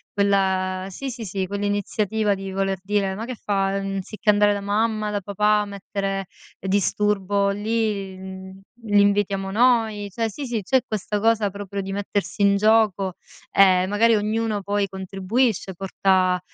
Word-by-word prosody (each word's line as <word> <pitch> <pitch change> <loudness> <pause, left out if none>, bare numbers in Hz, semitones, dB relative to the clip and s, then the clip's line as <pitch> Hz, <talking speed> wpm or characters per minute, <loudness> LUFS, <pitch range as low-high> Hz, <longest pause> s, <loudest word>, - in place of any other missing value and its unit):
quella 190 -2 +1
sì, 270 +8 -5
sì, 235 -3 -6
sì, 190 0 -3
quell'iniziativa 205 +1 -1
di 195 0 -6
voler 195 0 -1
dire: 200 -1 0
"Ma 220 - -5
che 255 - -5
fa? 195 -2 -1
Anziché 195 +2 -3
andare 205 0 +5
da 200 - -2
mamma, 215 +1 0
da 205 -1 -2
papà 210 +2 +2
a - - -3
mettere 195 -1 -4 0.3
disturbo 200 +1 +1
lì, 205 -2 -1
mhmm, 190 0 -9 0.2
li 205 -2 +4
invitiamo 200 -1 +1
noi". 220 -3 +2
Cioè 225 +3 -1
sì, 280 +6 -6
sì, 235 -4 -2
c'è 260 +6 +2
questa 210 -1 -3
cosa 220 -2 +2
proprio 200 0 -5
di 195 0 -6
mettersi 205 0 -3
in 200 0 +4
gioco 210 -3 +3 0.4
e 185 -1 +5
magari 225 +3 +3
ognuno 215 0 -1
poi 200 +1 0
contribuisce, 195 +2 -1
porta, 185 0 +1
200 Hz, 150 wpm, -23 LUFS, 195-210 Hz, 0.4 s, andare